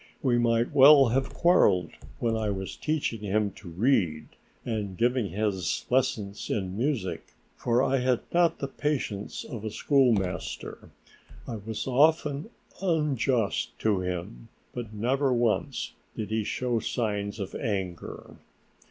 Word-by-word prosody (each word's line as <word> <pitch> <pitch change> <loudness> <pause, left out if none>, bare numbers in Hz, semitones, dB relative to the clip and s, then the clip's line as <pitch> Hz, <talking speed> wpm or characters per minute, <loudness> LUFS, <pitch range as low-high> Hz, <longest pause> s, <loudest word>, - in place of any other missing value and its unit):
We 120 -3 +3
might 115 0 +2
well 140 -1 +8
have 130 +3 0
quarreled 100 - +3 0.3
when 115 -1 0
I 110 -1 -1
was 95 -1 -4
teaching 150 -7 -1
him 105 0 0
to 95 -1 -12
read 90 - +1 0.4
and 105 -5 -3
giving 120 -3 +1
his 95 -1 -1
lessons 105 -6 0
in 95 -2 -2
music, 115 -5 -2 0.2
for 120 +1 +1
I 135 0 +2
had 125 -1 +1
not 170 -1 +3
the 140 - -3
patience 135 -8 -3
of 115 -4 -7
a 110 - -2
schoolmaster. 115 -6 0 0.6
I 115 - -4
was 110 +1 -5
often 145 - +2 0.3
unjust 140 - 0
to 105 -3 +2
him, 90 -9 -5 0.3
but 120 -3 -6
never 130 +6 +1
once 120 -2 0 0.2
did 110 -1 -5
he 110 0 0
show 120 +1 -1
signs 105 -2 -2
of 100 -1 -5
anger. 95 -6 -4
115 Hz, 135 wpm, -27 LUFS, 100-130 Hz, 0.6 s, well